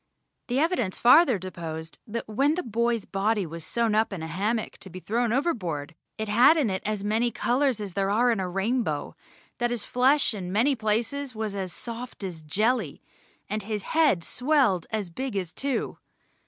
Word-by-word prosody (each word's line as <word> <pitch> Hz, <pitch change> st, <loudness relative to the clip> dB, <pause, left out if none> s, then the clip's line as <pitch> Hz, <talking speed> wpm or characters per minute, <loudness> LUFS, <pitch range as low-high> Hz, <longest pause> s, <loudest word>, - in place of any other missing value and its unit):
The 245 Hz, -, -1 dB
evidence 295 Hz, -, +1 dB
farther 255 Hz, 0 st, +6 dB
deposed 165 Hz, -3 st, -7 dB
that 230 Hz, +2 st, -4 dB
when 275 Hz, +8 st, +2 dB
the 360 Hz, -, -2 dB
boy's 235 Hz, -1 st, 0 dB
body 205 Hz, +1 st, 0 dB
was 165 Hz, 0 st, -7 dB
sewn 230 Hz, +2 st, 0 dB
up 220 Hz, +1 st, +2 dB
in 180 Hz, -5 st, -5 dB
a -, -, -4 dB
hammock 210 Hz, +7 st, -2 dB
to 190 Hz, -, -9 dB
be 185 Hz, +1 st, -8 dB
thrown 230 Hz, +4 st, 0 dB
overboard 180 Hz, -, -1 dB, 0.2 s
it 220 Hz, -, -3 dB
had 240 Hz, +10 st, +6 dB
in 265 Hz, -10 st, +1 dB
it 190 Hz, -, -2 dB
as 210 Hz, -2 st, -2 dB
many 220 Hz, +3 st, +1 dB
colours 250 Hz, 0 st, +1 dB
as 200 Hz, -3 st, -5 dB
there 195 Hz, 0 st, 0 dB
are 240 Hz, +4 st, +3 dB
in 225 Hz, -, 0 dB
a 185 Hz, -1 st, -2 dB
rainbow, 195 Hz, -, -1 dB, 0.4 s
that 240 Hz, -1 st, +1 dB
his 240 Hz, -2 st, -3 dB
flesh 265 Hz, +2 st, +3 dB
in 185 Hz, -4 st, -5 dB
many 245 Hz, +8 st, +3 dB
places 230 Hz, +4 st, -1 dB
was 215 Hz, -2 st, -3 dB
as 190 Hz, -2 st, -3 dB
soft 235 Hz, +2 st, -7 dB
as 175 Hz, -4 st, -5 dB
jelly, 210 Hz, -, 0 dB, 0.4 s
and 215 Hz, +2 st, -2 dB
his 210 Hz, -1 st, -3 dB
head 300 Hz, -, +4 dB
swelled 250 Hz, -, +1 dB
as 210 Hz, -5 st, -3 dB
big 260 Hz, +5 st, -4 dB
as 180 Hz, -3 st, -3 dB
two. 270 Hz, -4 st, -2 dB
220 Hz, 185 wpm, -26 LUFS, 190-245 Hz, 0.4 s, farther